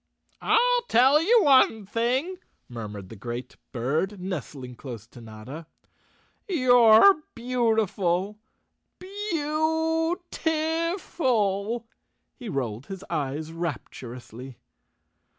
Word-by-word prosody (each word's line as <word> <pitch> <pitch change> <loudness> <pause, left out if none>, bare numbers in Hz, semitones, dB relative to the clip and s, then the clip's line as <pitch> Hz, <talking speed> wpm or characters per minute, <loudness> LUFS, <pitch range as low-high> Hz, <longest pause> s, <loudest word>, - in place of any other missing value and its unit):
"I'll - - +3
tell 265 +6 +5
you 440 +5 +4
one 260 -7 +4
thing," 250 - -1 0.3
murmured 105 -5 -8
the - - -10
great 120 +4 -7 0.2
bird, 155 - -2
nestling 145 -8 -6
close 120 -3 -9
to 120 +1 -15
Notta. 115 +9 -10 0.8
"You're 255 - +6
beautiful, 215 -5 0 0.6
beau 325 -3 -1
ti 320 +2 -1
ful!" 230 - -1 0.5
He 245 -5 -8
rolled 125 - -4
his 195 0 -8
eyes 155 0 -3
rapturously. 130 -5 -7
210 Hz, 90 wpm, -26 LUFS, -, 0.8 s, You're